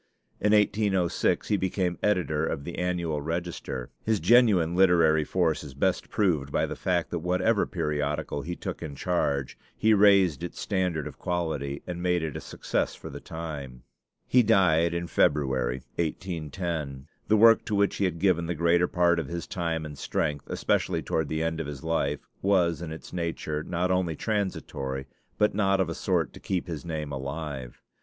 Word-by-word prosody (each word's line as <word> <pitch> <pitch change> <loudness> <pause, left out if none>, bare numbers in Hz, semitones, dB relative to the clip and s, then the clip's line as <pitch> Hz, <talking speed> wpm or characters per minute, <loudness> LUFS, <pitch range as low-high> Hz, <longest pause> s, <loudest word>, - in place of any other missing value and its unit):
In 105 - +2
1806 105 -4 +2
he 105 - +3
became 95 -2 -1
editor 90 -7 +1
of 70 -3 -2
the 85 - -6
Annual 85 -4 -1
Register. 80 -5 -4
His 110 -2 +1
genuine 95 -4 +4
literary 85 -4 +5
force 80 -1 0
is 70 -3 -10
best 90 +6 0
proved 80 -10 +1
by - - +1
the - - -5
fact 90 -3 -1
that 85 - -1
whatever 90 +2 +1
periodical 75 -1 -2
he 85 +5 -4
took - - -6
in 70 - -6
charge, 70 -5 -1 0.2
he 110 0 +4
raised 100 -7 +5
its 85 - -6
standard 90 -7 -1
of - - -8
quality 80 -6 -2
and 90 -1 -5
made 90 -2 +1
it 80 -4 -3
a - - -4
success - - -2
for - - -9
the - - -7
time. 70 -7 -7 0.4
He 125 - +5
died 85 -7 +3
in 85 0 -2
February, 65 -6 +1 0.2
1810. 80 -4 -3 0.2
The 110 - +4
work 115 +1 +7
to 105 - -1
which 100 0 +2
he 100 - +1
had 90 -3 -1
given 85 -2 +2
the 85 - -2
greater 85 +2 +3
part 85 -2 +2
of 80 - -3
his 85 0 -4
time 85 -3 -2
and 75 -1 -7
strength, 75 -3 -2
especially - - 0
toward 80 -3 -1
the 80 +1 -1
end 80 0 -1
of 80 - -3
his 70 -2 -7
life, 75 -3 0 0.2
was 90 -5 +2
in 80 -2 -5
its 80 - -9
nature 85 -3 -2
not 90 +3 -1
only 90 -3 +1
transitory, 70 -10 -3 0.3
but 105 - +3
not 95 -1 +2
of 95 -3 +1
a - - -2
sort - - 0
to - - -11
keep 95 -2 -2
his 80 -4 -5
name 80 -3 -4
alive. 70 -2 -5
85 Hz, 180 wpm, -27 LUFS, 75-90 Hz, 0.4 s, work